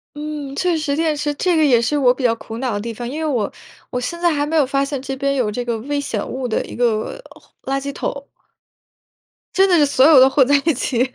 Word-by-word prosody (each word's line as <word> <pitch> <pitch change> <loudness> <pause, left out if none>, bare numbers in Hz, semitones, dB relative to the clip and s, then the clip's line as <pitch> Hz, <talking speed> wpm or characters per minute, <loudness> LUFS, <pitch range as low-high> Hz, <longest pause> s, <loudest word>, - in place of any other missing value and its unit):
嗯， 295 -2 -6
确 355 0 +1
实 300 -3 -1
电 320 -1 +1
池， 295 0 -1
这 350 +4 +1
个 315 - +4
也 250 -5 +4
是 245 +6 0
我 260 -4 +4
比 255 +1 -6
较 235 -2 +3
苦 225 0 -8
恼 255 0 -2
的 205 - -2
地 230 +2 -5
方。 240 +2 -6
因 295 +5 -5
为 320 - -1
我 240 -9 -1 0.4
我 250 - -2
现 340 +7 -5
在 345 -1 +3
还 290 -1 0
没 320 +2 -1
有 300 - +5
发 275 +1 0
现 275 -1 -4
这 270 0 -4
边 275 +1 0
有 240 -5 0
这 245 +4 -4
个 235 -2 -2
危 285 +4 -2
险 230 -7 -3
物 255 -1 -4
的 220 - -1
一 - - -9
个， 235 - -1 0.4
回 270 - -4
垃 275 - 0
圾 280 +1 -5
桶。 280 0 -5 1.3
真 385 +1 +4
的 360 - +4
是 300 -3 +4
所 275 -1 +4
有 305 -4 +8
都 260 - +7
混 270 -1 +3
在 285 - +3
一 325 - +3
起， 250 0 -1
275 Hz, 285 characters per minute, -19 LUFS, 245-300 Hz, 1.3 s, 有